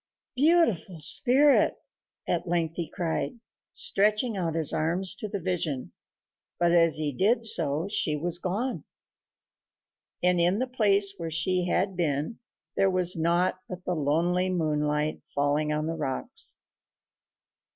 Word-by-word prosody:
"Beautiful 260 - +2
spirit," 270 - +5 0.5
at - - -1
length 165 -2 -1
he 170 -3 -3
cried, 175 +9 -3 0.3
stretching 210 +3 +2
out 170 -4 -2
his 160 -3 0
arms 170 +4 0
to 215 - -6
the 200 0 -4
vision; 165 -7 -3 0.7
but 175 0 +2
as 165 -2 +4
he 150 -2 -2
did 225 - +1
so 160 -4 +1
she 160 -6 -1
was 170 +3 -1
gone, 210 +9 -3 1.4
and 180 0 +3
in 175 +3 +2
the 255 - 0
place 205 -5 +2
where 165 -1 -5
she 180 +3 0
had 190 +2 0
been 155 +3 -2 0.4
there 195 - +3
was 180 -1 +1
nought 175 +3 +1
but 180 0 -8
the 180 - -1
lonely 170 +4 0
moonlight 150 -3 -1
falling 145 +2 +1
on 150 0 -1
the 165 - -2
rocks. 145 -5 -3
175 Hz, 135 wpm, -27 LUFS, 155-195 Hz, 1.4 s, spirit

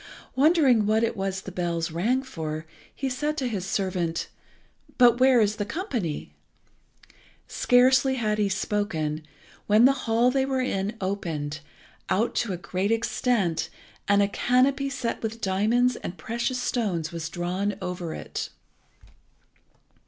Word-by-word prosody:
Wondering 270 -7 +4
what 220 +1 +3
it 230 - 0
was 195 -1 -2
the 190 - -8
bells 170 -2 -2
rang 230 +11 +1
for, 160 -10 -5 0.3
he 270 - -2
said 295 +4 -2
to 260 - -1
his 195 -5 -3
servant 180 -4 -1 0.7
"But 240 -1 +6
where 260 -1 +6
is 210 0 +2
the 210 - -1
company?" 225 - -4 1.1
Scarcely 260 +1 +4
had 215 -4 0
he 205 -1 +2
spoken 190 -6 -1 0.5
when 215 +3 +6
the 265 - +7 0.2
hall 235 +3 +4
they 265 0 +2
were 265 -1 -1
in 210 -4 -1
opened 160 -6 -3 0.5
out 225 +5 +1
to 235 - 0
a 180 - -2
great 185 +3 -2
extent, 225 -6 0 0.4
and 200 0 +4
a - - +2
canopy 260 +6 +2
set 255 -4 -3
with 225 0 -4
diamonds 225 +6 +2
and 180 - -7
precious 235 +3 -2
stones 200 -11 -1
was 165 -1 -4
drawn 185 +4 -2
over 180 -3 -4
it. - - -5
210 Hz, 140 wpm, -26 LUFS, 180-250 Hz, 1.1 s, the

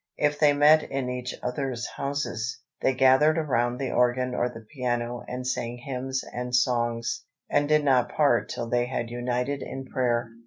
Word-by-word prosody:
If 150 0 +1
they 150 -2 +6
met 150 +2 +6
in 135 -3 -3
each 125 0 -4
other's 125 -1 -2
houses, 140 -4 -3 0.2
they 130 - +2
gathered 135 +5 +5
around 125 -6 +1
the 135 -1 -2
organ 125 +1 +2
or 125 0 0
the 115 - -10
piano 120 -2 -2
and 125 0 -5
sang 120 -1 -2
hymns 130 +1 -3
and 125 0 -2
songs, 120 -1 0 0.3
and 145 0 +2
did 150 -1 +4
not 125 -3 +3
part 140 -5 +2
till 120 - -4
they 120 +1 +1
had 120 -2 -3
united 125 +3 -2
in 135 0 -6
prayer. 120 -3 0
125 Hz, 170 wpm, -26 LUFS, 120-140 Hz, 0.3 s, they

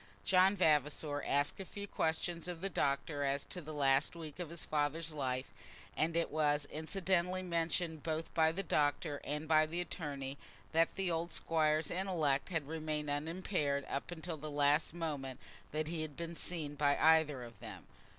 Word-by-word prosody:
John 190 +2 +5
Vavasor 150 -3 +2
asked 145 +5 +1
a - - -3
few 200 +2 -7
questions 170 0 -1
of 175 -2 -5
the 195 0 -1
doctor 145 0 0
as 140 0 0
to 180 - -6
the 155 -1 -7
last 140 +1 +3
weeks 160 -1 -8
of 175 -3 -4
his 170 0 -4
father's 155 +2 0
life; 130 -4 -1 0.5
and 165 +1 +1
it 170 - +1
was 150 -1 +2
incidentally 180 +2 0
mentioned, 165 -2 0
both 160 +1 -3
by 160 -1 +4
the 195 +4 -2
doctor 145 -2 +1
and 150 +2 -3
by 155 0 +5
the 170 +3 -3
attorney, 140 -6 -4 0.3
that 165 +1 +3
the 190 -2 0
old 165 +1 -2
Squire's 155 -1 +2
intellect 170 -7 +1
had 160 -6 -1
remained 155 -2 -2
unimpaired 150 -2 -1
up 140 - -3
to 175 -1 -5
the 155 0 -6
last 145 +2 +2
moment 140 -6 -3 0.3
that 155 0 -1
he 165 0 -2
had 155 -3 -5
been 170 0 -4
seen 160 -4 -3
by 145 -1 +2
either 155 -5 +4
of 115 -1 -11
them. - - -9
155 Hz, 175 wpm, -35 LUFS, 145-170 Hz, 0.5 s, John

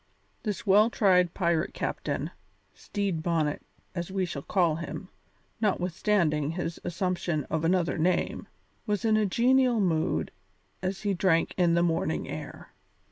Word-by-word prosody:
This 210 -1 -3
well 210 +3 +5
tried 180 -6 +3
pirate 170 -3 0
captain - - -3 0.4
Stede 200 -6 -3
Bonnet, 160 -3 0 0.3
as 175 0 -4
we 190 -1 0
shall 155 -5 -5
call 170 -2 +1
him, 170 - -6 0.5
notwithstanding 175 -6 +1
his 170 -1 -4
assumption 175 -3 -1
of 160 0 0
another 165 -3 +1
name 175 +2 0 0.4
was 210 +1 -1
in 220 -1 +4
a 215 -1 +2
genial 250 +3 +3
mood 165 -5 0 0.5
as 185 +1 -3
he 205 -1 +1
drank 175 -2 +2
in 175 -2 +3
the 170 - +3
morning 165 -2 0
air. - - -8
180 Hz, 135 wpm, -28 LUFS, 165-200 Hz, 0.5 s, well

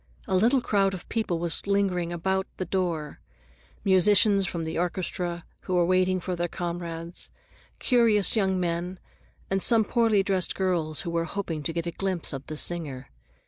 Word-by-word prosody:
A 190 - +1
little 240 +7 +4
crowd 195 -4 +1
of 180 - -10
people 215 -7 -1
was 170 +3 0
lingering 190 -4 +1
about 190 +3 -1
the 185 - -3
door—musicians 180 - +1
from 170 -2 -3
the 160 - -4
orchestra 175 -1 -3 0.2
who 185 - -1
were 175 -1 +4
waiting 185 +1 +2
for 180 +1 -3
their 175 0 -1
comrades, 170 -1 -4 0.5
curious 230 -6 +3
young 190 -3 +1
men, 175 +1 -2 0.5
and 195 0 +1
some 225 0 +4
poorly 225 -4 +3
dressed 190 -4 0
girls 170 -5 -1
who 170 - -4
were 165 0 0
hoping 165 -3 -4
to 155 - -2
get 170 0 -3
a 170 - -2
glimpse 185 -3 -3
of 135 0 -6
the 155 - -5
singer. 150 -7 -2
180 Hz, 165 wpm, -26 LUFS, 170-195 Hz, 0.5 s, little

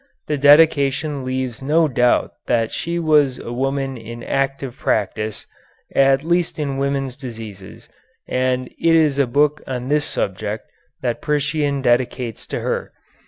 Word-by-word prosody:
The 150 - -1
dedication 145 -1 +4
leaves 130 -2 -3
no 155 +4 +3
doubt 125 -3 +2 0.2
that 115 -2 +1
she 170 +1 -2
was 150 -5 +3
a 120 - -7
woman 135 +1 -1
in 115 +1 -9
active 135 -2 -2
practice, 110 -6 -1 0.5
at 135 0 +4
least 170 +1 0
in 140 -3 -2
women's 135 -2 -1
diseases, 110 -7 -9 0.4
and 130 0 0
it 165 0 +4
is 150 -4 +3
a 140 - +3
book 145 +4 +2
on 125 -1 -4
this 150 0 +2
subject 105 +3 -3 0.4
that 120 -2 -1
Priscian 145 -1 0
dedicates 120 -1 0
to - - -3
her. - - -3
135 Hz, 140 wpm, -20 LUFS, 120-145 Hz, 0.5 s, dedication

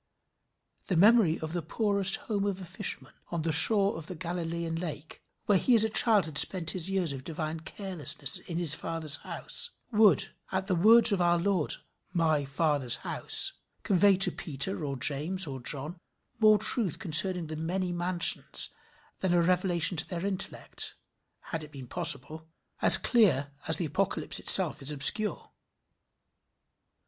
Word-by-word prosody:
The 180 - -1
memory 205 -3 +3
of 160 +1 -6
the 175 - -3
poorest 200 +3 -1
home 205 -3 -3
of 195 -2 -4
a 185 - -9
fisherman 190 +3 -7 0.2
on 170 -2 -4
the 165 - -2
shore 200 +5 +4
of 160 - -11
the 185 - -8
Galilean 170 -1 -5
lake, 160 -3 -8 0.2
where 200 -3 +2
he 250 - +2
as 220 - +6
a 220 - -1
child 215 -3 +3
had 155 -2 +3
spent 170 -4 +3
his 185 0 -1
years 185 -6 -1
of 130 -1 -9
divine 160 +1 -6
carelessness 170 -6 -2
in 170 - -8
his 170 -4 +2
father's 160 -2 -1
house, 480 - -3 0.2
would, 210 -3 +2 0.2
at 190 0 -3
the 195 - -2
words 220 +7 +6
of 195 -3 -1
our 175 0 +2
Lord 180 -3 -2 0.4
my 155 -4 0
Father's 140 -3 0
house, - - -1 0.3
convey 195 +1 +2
to 185 0 +5
Peter 155 +4 -3
or 140 -2 -5
James 155 +9 +1
or 135 -3 -8
John 145 +7 -4 0.4
more 215 -1 +4
truth 210 - +1
concerning 180 -1 +2
the 155 0 -7
many 180 +4 -4
mansions 175 0 +1 0.5
than 185 -2 -1
a 175 - +2
revelation 175 -1 0
to 160 - +1
their 175 0 -5
intellect, 195 -1 -1 0.6
had 165 -2 -5
it 150 - -13
been 135 -3 -11
possible, 155 +6 -2 0.3
as - - +8
clear 150 - +1 0.2
as 160 - +1
the 175 - -3
Apocalypse 190 +6 -3
itself 180 -6 +5
is 135 - -4
obscure. 150 +9 +1
175 Hz, 160 wpm, -27 LUFS, 155-195 Hz, 0.6 s, as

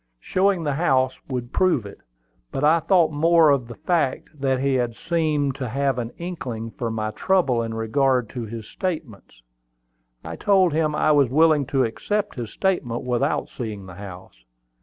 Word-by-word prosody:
Showing 185 - +1
the 145 -2 0
house 135 -4 +2
would 125 -2 -5
prove 175 - +2
it; 100 - -10 0.5
but 135 - -3
I 160 +3 +5
thought 165 -1 +3
more 160 +1 +4
of 130 -4 +1
the 120 - -9
fact 160 - -1
that 135 -1 +1
he 135 -2 +1
seemed 155 -4 0
to 130 -4 -4
have 135 0 0
an 115 -1 -3
inkling 125 -11 -5
of 115 -2 -2
my 110 -1 -2
trouble 135 - +1
in 115 -1 -4
regard 125 +2 +1
to 125 -3 -5
his 110 0 -8
statements. 115 - -6 0.8
I - - -7
told 190 -5 +3
him 155 -1 +1
I 155 0 +3
was 140 -4 +4
willing 155 0 +3
to 135 -1 +1
accept 205 - -2
his 120 -3 -6
statement 135 - -1
without 125 +3 0
seeing 105 -6 -6
the 95 - -10
house. 95 -9 -11
135 Hz, 170 wpm, -23 LUFS, 115-160 Hz, 0.8 s, I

